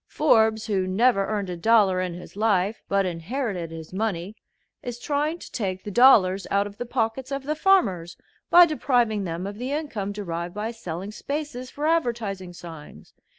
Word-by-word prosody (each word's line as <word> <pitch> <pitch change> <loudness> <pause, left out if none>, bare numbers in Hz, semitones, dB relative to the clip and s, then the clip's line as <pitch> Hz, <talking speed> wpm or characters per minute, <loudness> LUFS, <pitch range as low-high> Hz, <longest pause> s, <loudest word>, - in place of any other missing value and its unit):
Forbes, 220 -7 +3
who 195 -4 0
never 195 +1 +2
earned 205 -4 -2
a - - -3
dollar 195 -1 +3
in 180 -2 -3
his 180 - -11
life, 205 -1 +1
but 195 -1 +2
inherited 180 - -3
his 160 +1 -9
money, 195 -1 -2 0.5
is 245 -1 -6
trying 295 +5 -1
to - - -12
take 185 -5 -3
the 205 - -6
dollars 195 -6 +5
out 200 0 +2
of 205 0 -10
the 245 - -4
pockets 245 +2 -2
of 275 0 -3
the 300 +3 -1
farmers 225 - +2 0.3
by 350 0 +9
depriving 240 - +1
them 170 +1 -4
of 200 +2 -6
the 255 +2 -3
income 285 -10 -3
derived 175 -3 -5
by 215 +2 -3
selling 195 -3 -6
spaces 280 +1 -5
for 295 +3 -5
advertising 230 - -1
signs. 165 -3 -12
210 Hz, 175 wpm, -25 LUFS, 185-250 Hz, 0.5 s, by